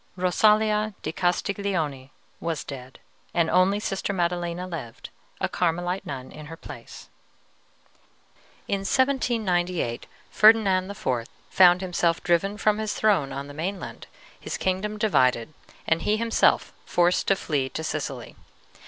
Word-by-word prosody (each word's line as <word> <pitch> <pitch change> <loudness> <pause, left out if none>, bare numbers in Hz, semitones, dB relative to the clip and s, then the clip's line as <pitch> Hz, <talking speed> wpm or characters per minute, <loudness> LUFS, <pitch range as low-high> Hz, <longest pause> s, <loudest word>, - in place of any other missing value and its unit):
Rosalia 210 +3 +2
di 155 - -2
Castiglione 175 -6 -1 0.3
was 165 -3 -3
dead, 130 -2 -9 0.4
and 170 -1 +2
only 185 +3 +3
Sister 200 -1 -2
Maddelena 175 -1 -1
lived, 155 -11 -8 0.3
a - - 0
Carmelite 175 +2 -1
nun, 130 -2 -6
in 150 0 -10
her 165 +1 -9
place. - - -11 1.6
"In 200 - 0
1798 195 - 0 0.2
Ferdinand 200 -4 +5
IV. 130 -12 -2 0.2
found 180 -1 +6
himself 175 -2 0
driven 190 +4 +1
from 215 0 +2
his 215 -1 -2
throne 195 -11 +2
on 140 +1 -5
the 145 - -10
mainland, 180 +6 -5 0.3
his - - -5
kingdom 190 +3 -1
divided, 130 - +2 0.3
and 160 +1 +1
he 210 +1 +1
himself 230 0 +2
forced 175 +1 +2
to 195 - +4
flee 145 -7 -1
to 160 - -5
Sicily. 140 -6 -4
180 Hz, 125 wpm, -25 LUFS, 155-200 Hz, 1.6 s, found